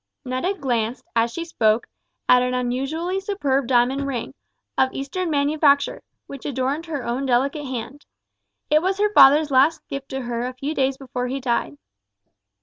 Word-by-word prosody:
Netta 260 Hz, +10 st, -1 dB
glanced, 240 Hz, -, -2 dB
as 230 Hz, 0 st, +2 dB
she 335 Hz, +6 st, -5 dB
spoke, 220 Hz, -8 st, +1 dB, 0.4 s
at 250 Hz, 0 st, +6 dB
an 250 Hz, 0 st, 0 dB
unusually 275 Hz, +9 st, -2 dB
superb 285 Hz, -, -1 dB
diamond 260 Hz, +2 st, +2 dB
ring, 250 Hz, -4 st, -4 dB, 0.4 s
of 265 Hz, -, +2 dB
Eastern 330 Hz, +7 st, -3 dB
manufacture, 285 Hz, -1 st, +2 dB, 0.2 s
which 275 Hz, -2 st, -10 dB
adorned 280 Hz, +4 st, -2 dB
her 290 Hz, -6 st, -4 dB
own 255 Hz, +3 st, -2 dB
delicate 275 Hz, +4 st, +1 dB
hand. 255 Hz, +2 st, -6 dB, 0.6 s
It 305 Hz, +1 st, +5 dB
was 380 Hz, +2 st, 0 dB
her 420 Hz, 0 st, +1 dB
father's 295 Hz, 0 st, +7 dB
last 275 Hz, +5 st, +3 dB
gift 275 Hz, 0 st, -6 dB
to 265 Hz, 0 st, -4 dB
her 240 Hz, 0 st, -3 dB
a 255 Hz, -, -5 dB
few 275 Hz, +4 st, -3 dB
days 265 Hz, -2 st, 0 dB
before 250 Hz, -2 st, -4 dB
he 265 Hz, +2 st, -3 dB
died. 235 Hz, -, -1 dB
270 Hz, 160 wpm, -22 LUFS, 250-295 Hz, 0.6 s, father's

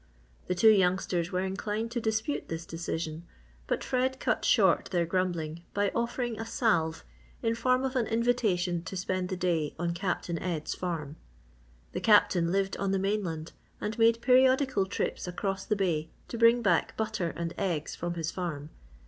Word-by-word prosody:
The 180 Hz, -, 0 dB
two 220 Hz, +5 st, +7 dB
youngsters 180 Hz, -3 st, +1 dB
were 185 Hz, 0 st, 0 dB
inclined 210 Hz, +4 st, -3 dB
to 240 Hz, 0 st, -2 dB
dispute 220 Hz, +5 st, -1 dB
this 165 Hz, 0 st, -5 dB
decision 165 Hz, -1 st, -4 dB, 0.4 s
but -, -, -1 dB
Fred 260 Hz, +1 st, 0 dB
cut -, -, 0 dB
short -, -, +4 dB
their 175 Hz, -2 st, 0 dB
grumbling 170 Hz, -2 st, -2 dB
by 205 Hz, -1 st, +2 dB
offering 235 Hz, -1 st, -2 dB
a 225 Hz, -, -3 dB
salve 170 Hz, -10 st, +1 dB, 0.4 s
in 225 Hz, -, +2 dB
form 255 Hz, +3 st, +2 dB
of 265 Hz, 0 st, -2 dB
an 240 Hz, -3 st, +1 dB
invitation 215 Hz, -7 st, +1 dB
to 190 Hz, +3 st, -5 dB
spend 185 Hz, 0 st, -2 dB
the 185 Hz, -, -3 dB
day 170 Hz, -5 st, 0 dB
on 170 Hz, +1 st, -1 dB
Captain 175 Hz, -2 st, -2 dB
Ed's 170 Hz, -4 st, -3 dB
farm. 160 Hz, -4 st, -4 dB, 0.7 s
The 180 Hz, -, -4 dB
Captain 185 Hz, -5 st, +4 dB
lived 195 Hz, 0 st, 0 dB
on 195 Hz, -, -1 dB
the 195 Hz, -, +2 dB
mainland 190 Hz, -5 st, -2 dB, 0.3 s
and 210 Hz, +1 st, -3 dB
made 230 Hz, +1 st, +4 dB
periodical 255 Hz, -4 st, +4 dB
trips 190 Hz, -, -3 dB
across 195 Hz, +2 st, -3 dB
the 210 Hz, -, +1 dB
bay 165 Hz, -6 st, 0 dB, 0.2 s
to 235 Hz, -, -4 dB
bring 235 Hz, +1 st, +5 dB
back 175 Hz, -6 st, +2 dB
butter 190 Hz, -6 st, -1 dB
and 170 Hz, +1 st, -3 dB
eggs 170 Hz, -6 st, -1 dB
from 175 Hz, 0 st, -3 dB
his 165 Hz, -1 st, -2 dB
farm. 160 Hz, -5 st, -4 dB
190 Hz, 170 wpm, -29 LUFS, 170-225 Hz, 0.7 s, two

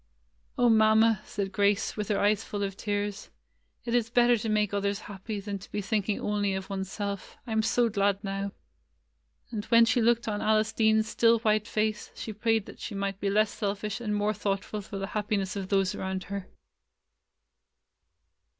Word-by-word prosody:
"O 245 Hz, -1 st, +4 dB
Mamma 220 Hz, -1 st, +5 dB
!" -, -, -23 dB
said 195 Hz, -1 st, -3 dB
Grace, 200 Hz, +1 st, +1 dB
with 210 Hz, -2 st, -3 dB
her 205 Hz, -, +1 dB
eyes 205 Hz, +1 st, +2 dB
full 205 Hz, -1 st, -4 dB
of 195 Hz, -1 st, -3 dB
tears, 205 Hz, 0 st, -3 dB, 0.6 s
"it 235 Hz, -, -2 dB
is 235 Hz, -2 st, +2 dB
better 240 Hz, 0 st, +5 dB
to 225 Hz, 0 st, -3 dB
make 210 Hz, -1 st, +1 dB
others 200 Hz, +1 st, -1 dB
happy 205 Hz, +1 st, -6 dB
than 200 Hz, 0 st, -5 dB
to 190 Hz, -, -14 dB
be -, -, -2 dB
thinking 205 Hz, 0 st, -1 dB
only 205 Hz, -2 st, 0 dB
of 190 Hz, +1 st, -5 dB
one's 190 Hz, -1 st, -3 dB
self. 200 Hz, -2 st, -5 dB
I 235 Hz, -, -7 dB
am 220 Hz, 0 st, +2 dB
so 240 Hz, +2 st, +2 dB
glad 200 Hz, -1 st, +1 dB
now 195 Hz, 0 st, -3 dB, 0.5 s
!" -, -, -40 dB
And 215 Hz, -3 st, -3 dB
when 230 Hz, -1 st, +6 dB
she 235 Hz, +1 st, +2 dB
looked 235 Hz, 0 st, +2 dB
on 210 Hz, -1 st, -1 dB
Alice 215 Hz, 0 st, +2 dB
Dean's 220 Hz, -1 st, +3 dB
still 230 Hz, +1 st, +4 dB
white 215 Hz, -1 st, +2 dB
face, 215 Hz, -1 st, -1 dB
she 220 Hz, -, -6 dB
prayed 220 Hz, 0 st, +1 dB
that -, -, -12 dB
she 210 Hz, -, -6 dB
might 195 Hz, -1 st, -2 dB
be 200 Hz, -, 0 dB
less 210 Hz, +1 st, +3 dB
selfish 205 Hz, +1 st, -3 dB
and 210 Hz, -3 st, -1 dB
more 205 Hz, +1 st, +1 dB
thoughtful 205 Hz, +1 st, -2 dB
for 200 Hz, 0 st, -7 dB
the 195 Hz, -, -2 dB
happiness 205 Hz, -2 st, -1 dB
of 195 Hz, -2 st, -4 dB
those 195 Hz, -2 st, +2 dB
around 190 Hz, 0 st, -3 dB
her. 200 Hz, 0 st, -5 dB
210 Hz, 195 wpm, -28 LUFS, 200-220 Hz, 0.6 s, when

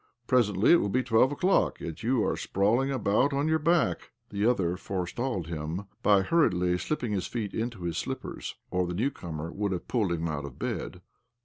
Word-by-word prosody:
Presently 110 Hz, -6 st, +3 dB
it 175 Hz, -, +8 dB
will 100 Hz, -, -1 dB
be 130 Hz, +5 st, +1 dB
twelve 120 Hz, +3 st, +4 dB
o'clock, 185 Hz, +6 st, +2 dB
yet 80 Hz, +3 st, -6 dB
you 120 Hz, 0 st, +1 dB
are -, -, 0 dB
sprawling 115 Hz, +8 st, +1 dB
about 130 Hz, +1 st, +2 dB
on 140 Hz, +2 st, +1 dB
your 160 Hz, 0 st, +2 dB
back 165 Hz, +1 st, +2 dB
I -, -, -18 dB
" -, -, -48 dB
The 100 Hz, +2 st, +1 dB
other 90 Hz, -8 st, +1 dB
forestalled 95 Hz, +2 st, -3 dB
him 80 Hz, +3 st, -4 dB, 0.2 s
by 100 Hz, -3 st, +4 dB
hurriedly 90 Hz, -, +2 dB
slipping 120 Hz, -, -2 dB
his 100 Hz, -3 st, -1 dB
feet 110 Hz, -5 st, -4 dB
into 110 Hz, -4 st, -3 dB
his 85 Hz, -2 st, -2 dB
slippers, -, -, -5 dB, 0.2 s
or 90 Hz, -1 st, +1 dB
the 90 Hz, -, -3 dB
new 125 Hz, +9 st, +1 dB
comer 80 Hz, -, -6 dB
would 100 Hz, -1 st, -2 dB
have 90 Hz, -, -5 dB
pulled 105 Hz, -7 st, 0 dB
him 85 Hz, -1 st, -1 dB
out 75 Hz, -3 st, -3 dB
of 70 Hz, -, -9 dB
bed. -, -, -4 dB
100 Hz, 205 wpm, -28 LUFS, 90-125 Hz, 0.2 s, it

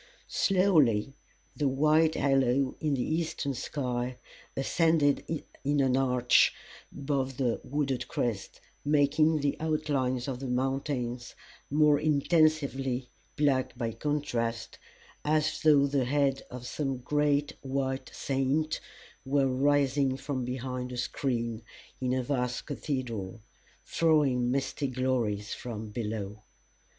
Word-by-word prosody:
Slowly 155 Hz, -, +3 dB, 0.4 s
the 145 Hz, -, 0 dB
white 155 Hz, +4 st, +3 dB
halo 135 Hz, -1 st, +2 dB
in 150 Hz, -3 st, 0 dB
the 125 Hz, -, -1 dB
eastern 155 Hz, -2 st, -1 dB
sky 125 Hz, -1 st, -3 dB, 0.4 s
ascended 150 Hz, +1 st, +2 dB, 0.4 s
in 145 Hz, +1 st, +1 dB
an 130 Hz, -2 st, +3 dB
arch 125 Hz, -2 st, +4 dB, 0.4 s
above 135 Hz, -2 st, -2 dB
the 125 Hz, -4 st, 0 dB
wooded 135 Hz, -3 st, -2 dB
crests, 110 Hz, -5 st, -3 dB, 0.2 s
making 150 Hz, +2 st, +3 dB
the 140 Hz, 0 st, +1 dB
outlines 145 Hz, -5 st, 0 dB
of 130 Hz, -2 st, -3 dB
the 135 Hz, -, -5 dB
mountains 125 Hz, -1 st, -2 dB, 0.3 s
more 150 Hz, 0 st, +4 dB
intensely 140 Hz, -4 st, +1 dB, 0.3 s
black 135 Hz, -4 st, +1 dB
by 115 Hz, -2 st, -2 dB
contrast, 115 Hz, -4 st, -2 dB, 0.4 s
as 155 Hz, +1 st, +1 dB
though 145 Hz, -3 st, +5 dB
the 140 Hz, -2 st, +1 dB
head 135 Hz, 0 st, +1 dB
of 125 Hz, -1 st, -8 dB
some 135 Hz, 0 st, -2 dB
great 145 Hz, +2 st, +1 dB
white 135 Hz, 0 st, -2 dB
saint 140 Hz, +3 st, 0 dB, 0.4 s
were 135 Hz, +1 st, +2 dB
rising 135 Hz, 0 st, +2 dB
from 135 Hz, -2 st, -3 dB
behind 125 Hz, 0 st, -4 dB
a 125 Hz, -, -5 dB
screen 120 Hz, -3 st, -2 dB, 0.4 s
in 125 Hz, -1 st, -1 dB
a 130 Hz, 0 st, 0 dB
vast 125 Hz, -2 st, -2 dB
cathedral, 125 Hz, -9 st, -4 dB, 0.5 s
throwing 145 Hz, -7 st, +2 dB
misty 135 Hz, +2 st, -1 dB
glories 125 Hz, -5 st, -1 dB
from 110 Hz, -3 st, -6 dB
below. 105 Hz, -2 st, -4 dB
135 Hz, 115 wpm, -29 LUFS, 125-145 Hz, 0.5 s, though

